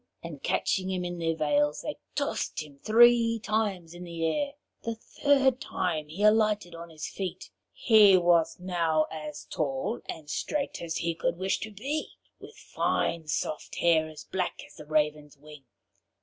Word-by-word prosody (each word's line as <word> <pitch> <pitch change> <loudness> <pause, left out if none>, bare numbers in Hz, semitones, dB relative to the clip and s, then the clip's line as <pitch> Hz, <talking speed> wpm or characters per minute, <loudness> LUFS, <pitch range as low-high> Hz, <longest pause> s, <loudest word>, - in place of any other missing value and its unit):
and - - -8
catching 190 -1 0
him 185 -1 -2
in 175 0 -4
their 165 -1 0
veils, 145 -1 +1
they 300 - -3 0.2
tossed 285 - -2
him 145 -2 -15
three 230 +2 +5
times 210 -6 -2
in 175 +1 -9
the 170 -2 -3
air. 280 - 0 0.3
The 230 0 -3
third 270 +2 +2
time 160 -5 -2
he 170 +7 -5
alighted 210 -4 +3
on 170 0 -9
his 155 -1 -6
feet. 190 -3 -6 0.2
He 210 -5 +6
was 170 -2 +3
now 170 -4 +1
as 150 -2 -7
tall 135 -5 -2
and 155 -2 -6
straight 285 - -2
as 165 -1 -3
he 170 0 -1
could 170 +1 -1
wish 190 +1 0
to 220 - -5
be, 275 +10 -4 0.3
with - - -13
fine 165 -2 -1
soft 150 0 -3
hair 160 -2 +3
as 155 -1 -10
black 185 -1 -3
as - - -17
the 150 - -12
raven's 150 -1 0
wing. 150 -1 -14
170 Hz, 165 wpm, -28 LUFS, 155-215 Hz, 0.3 s, He